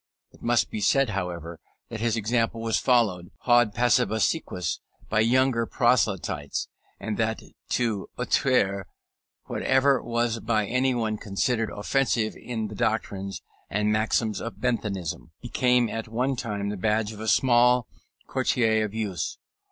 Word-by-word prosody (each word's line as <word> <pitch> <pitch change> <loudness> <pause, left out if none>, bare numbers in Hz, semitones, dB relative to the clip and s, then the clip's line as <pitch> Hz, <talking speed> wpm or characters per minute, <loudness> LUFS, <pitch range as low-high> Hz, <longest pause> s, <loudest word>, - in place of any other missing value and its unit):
It - - -21
must 120 0 +1
be 110 - -3
said, 135 +4 +3
however, 85 -4 -4 0.3
that 110 - -5
his 115 0 0
example 115 +1 0
was 115 -1 0
followed, 105 -9 +2
haud 120 -3 +4
passibus 120 -2 +3
aequis, 90 - -4 0.3
by 105 - +2
younger 120 0 +3
proselytes, 100 - 0 0.3
and - - -3
that - - 0 0.3
to 115 -5 -1
outrer 100 -7 +1 0.6
whatever 135 0 +2
was 120 -1 -1
by 110 -1 0
anybody 120 -2 0
considered 110 +3 -1
offensive 115 0 0
in 110 -3 -4
the 105 - -9
doctrines 100 -2 -2 0.3
and 105 +1 +1
maxims 110 0 +1
of 110 -4 -6
Benthamism, 105 -8 -2
became 125 -1 +2
at 115 +1 -4
one 125 +4 0
time 105 -5 -3
the 105 - -4
badge 105 +2 0
of 105 - -11
a 110 - -5
small 125 +2 +4 0.4
coterie 110 -3 +2
of 105 0 -3
youths. 105 -6 -3
110 Hz, 135 wpm, -26 LUFS, 105-120 Hz, 0.6 s, haud